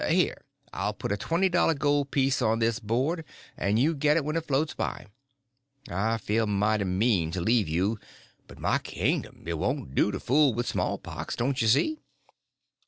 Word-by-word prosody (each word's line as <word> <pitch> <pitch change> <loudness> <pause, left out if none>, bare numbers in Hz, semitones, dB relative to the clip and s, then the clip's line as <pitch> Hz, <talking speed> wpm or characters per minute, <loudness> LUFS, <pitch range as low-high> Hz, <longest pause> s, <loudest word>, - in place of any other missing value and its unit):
Here, - - +2 0.4
I'll - - -2
put - - -4
a - - +2
twenty 170 - +1
dollar 175 -3 +2
gold 145 -1 +1
piece 135 0 +1
on 110 +1 +2
this 115 0 +1
board, 130 +10 -1 0.3
and 100 +3 0
you 145 +8 +3
get 150 +1 +2
it 155 - 0
when 155 +1 -2
it 165 -1 -2
floats 150 +3 0
by. - - -4 0.9
I 110 +6 0
feel 110 +1 0
mighty 105 0 +1
mean 95 -2 +1
to 90 - -3
leave 110 +2 +2
you; 95 +8 0 0.5
but - - -13
my - - +1
kingdom! - - -2
it 85 -1 -3
won't 65 - -2
do 100 - +3
to 95 - -4
fool 140 -2 +3
with 120 +1 -1
small - - -1
pox, - - -6
don't 130 +2 0
you 115 - +2
see?" 305 - +3
115 Hz, 185 wpm, -27 LUFS, 105-145 Hz, 0.9 s, you